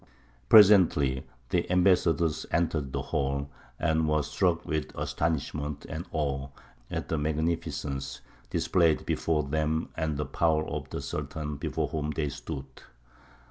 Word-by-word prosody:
Presently 90 -11 +6 0.2
the 85 -1 0
ambassadors 85 -4 +3
entered 80 -5 0
the - - -2
hall, 70 +1 -1 0.3
and 80 0 +1
were 75 -1 +2
struck 85 +4 0
with 80 -1 -2
astonishment 75 -2 -2
and 80 +5 -5
awe 70 -3 -1 0.4
at - - -3
the 80 - 0
magnificence 75 -3 -2 0.3
displayed 85 -4 +2
before 80 -2 0
them 80 +2 -1
and 80 -3 -1
the 75 - -1
power 80 -2 +1
of - - -5
the - - -4
Sultan 75 -2 -4
before - - -2
whom 75 -1 -2
they 75 -1 -1
stood. 70 0 -6
75 Hz, 130 wpm, -28 LUFS, 70-80 Hz, 0.4 s, Presently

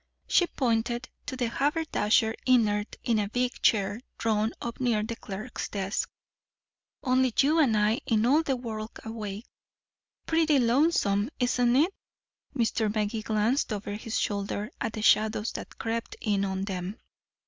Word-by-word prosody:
She 355 - +4
pointed 240 -2 -1 0.2
to 260 - -3
the 245 -2 0
haberdasher 245 -5 +1
inert 210 -4 +2
in 230 -3 +2
a 205 -1 -1
big 250 +2 -1
chair 205 0 +2 0.2
drawn 220 0 +1
up 235 -1 -5
near 235 -5 +1
the 230 +2 -4
clerk's 215 +3 -6
desk. 195 -1 -2 0.9
"Only 255 -1 +3
you 305 +4 +4
and 245 -8 +4
I 210 +2 +3
in 220 -1 +2
all 285 +6 +5
the 275 -5 0
world 225 -3 -6
awake." 215 -1 -5 0.8
"Pretty 320 -2 +3
lonesome, 235 -5 +2
isn't 245 -1 +2
it?" 325 +8 +3 0.6
Mr. 225 -2 +1
Magee 215 +1 -1
glanced 220 +5 +1
over 205 -1 -3
his 220 +1 -3
shoulder 205 +2 -2
at 225 - -2
the 215 - -4
shadows 215 0 +3
that - - -8
crept 230 0 -3
in 200 -2 0
on 190 0 -2
them. 190 +1 -4
225 Hz, 150 wpm, -28 LUFS, 210-250 Hz, 0.9 s, all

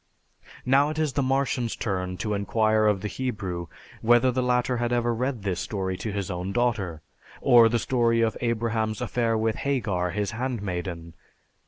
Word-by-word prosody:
Now 140 +3 +4
it 155 - -5
is 155 -4 0
the 140 - +1
Martian's 130 -3 0
turn 90 -4 -3
to 105 +2 -2
inquire 110 +2 +2
of 100 -3 +2
the 105 - -2
Hebrew 100 -9 -4 0.3
whether 120 +2 +4
the 130 +1 0
latter 125 0 +1
had 120 0 -1
ever 120 -1 +1
read 125 -2 -2
this 95 -3 -1
story 95 -3 -3
to 110 - -4
his 100 -1 -3
own 90 +2 -3
daughter? 100 -9 -1 0.4
Or, 120 -2 +6
the 120 - +1
story 115 -1 +2
of 115 -1 +1
Abraham's 115 -2 -1
affair 120 -2 0
with 110 0 0
Hagar, 105 -11 -1
his 100 +2 -2
handmaiden? 95 -9 -4
115 Hz, 170 wpm, -26 LUFS, 100-125 Hz, 0.4 s, Or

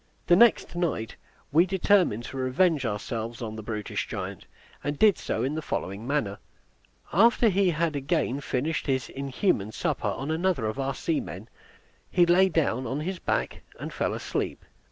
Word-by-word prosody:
The 175 - +6
next 230 -3 +4
night 160 - -2 0.4
we 170 +5 +5
determined 185 - +3
to 135 - -7
revenge 135 +2 +2
ourselves 115 +2 -4
on 110 -2 -5
the 110 - -6
brutish 105 -1 -4
giant, - - -6 0.4
and 145 +1 -2
did 210 +1 +6
so - - -2
in 135 +3 -1
the 160 - -2
following 100 -5 -4
manner. 115 -9 -1 0.7
After 230 +5 +5
he 195 -1 +3
had 165 -1 0
again 140 -1 0
finished 145 +5 -2
his 130 -3 0
inhuman 135 - -1
supper - - -2
on 140 +3 -2
another 170 -5 0
of 110 +5 -3
our 135 -1 -1
seamen, 115 - -3 0.6
he 175 - +4
lay 185 +2 +5
down 135 -7 0
on 135 +5 -2
his 180 +3 -3
back, - - -1 0.2
and - - -6
fell - - -1
asleep. - - -3
145 Hz, 165 wpm, -27 LUFS, 120-175 Hz, 0.7 s, The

